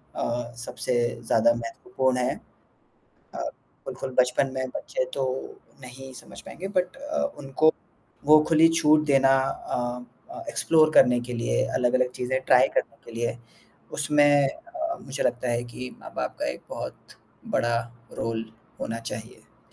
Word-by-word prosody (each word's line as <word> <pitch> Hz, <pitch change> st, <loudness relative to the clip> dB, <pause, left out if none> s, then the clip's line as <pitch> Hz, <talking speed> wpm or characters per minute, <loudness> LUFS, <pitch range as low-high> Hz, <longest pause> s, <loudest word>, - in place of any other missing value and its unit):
अ, 120 Hz, 0 st, -2 dB
सबसे 125 Hz, +1 st, -3 dB, 0.3 s
ज़्यादा 115 Hz, +1 st, +4 dB
महत्वपूर्ण 130 Hz, +3 st, -1 dB
है 125 Hz, -, 0 dB, 1.0 s
अ, -, -, -4 dB, 0.5 s
बिल्कुल 130 Hz, -1 st, -5 dB
बचपन 125 Hz, +2 st, +3 dB
में 130 Hz, 0 st, -1 dB
बच्चे 130 Hz, -, -2 dB
तो 135 Hz, -, -1 dB, 0.6 s
नहीं 130 Hz, +1 st, -10 dB
समझ 125 Hz, -, -11 dB
पाएँगे 190 Hz, +3 st, -7 dB
बट 185 Hz, +3 st, -1 dB
अ, 295 Hz, +2 st, -2 dB, 0.2 s
उनको 145 Hz, +3 st, +3 dB, 0.5 s
वो 155 Hz, +1 st, +8 dB
खुली 165 Hz, 0 st, +7 dB
छूट 150 Hz, 0 st, +5 dB
देना 135 Hz, -2 st, +5 dB
अ 130 Hz, -1 st, -2 dB, 0.5 s
अ, -, -, -7 dB
एक्सप्लोर 160 Hz, -, +4 dB
करने 125 Hz, 0 st, +6 dB
के 120 Hz, 0 st, -6 dB
लिए, 90 Hz, -, +1 dB
अलग-अलग 125 Hz, +1 st, +2 dB
चीज़ें 125 Hz, +1 st, -1 dB
ट्राई 130 Hz, +1 st, +6 dB
करने 140 Hz, -, 0 dB
के -, -, -11 dB
लिए, 120 Hz, 0 st, -1 dB, 0.6 s
उसमें 145 Hz, -1 st, +4 dB
अ, 335 Hz, 0 st, -5 dB
मुझे 135 Hz, +1 st, -4 dB
लगता 125 Hz, 0 st, 0 dB
है 120 Hz, 0 st, 0 dB
कि 125 Hz, +1 st, -7 dB
माँ-बाप -, -, -5 dB
का -, -, -1 dB
एक 65 Hz, -, -10 dB
बहुत -, -, -8 dB, 0.4 s
बड़ा 120 Hz, 0 st, +2 dB, 0.4 s
रोल 115 Hz, 0 st, -2 dB, 0.4 s
होना 115 Hz, 0 st, -3 dB
चाहिए। 110 Hz, +1 st, -10 dB
130 Hz, 145 wpm, -26 LUFS, 120-150 Hz, 1.0 s, वो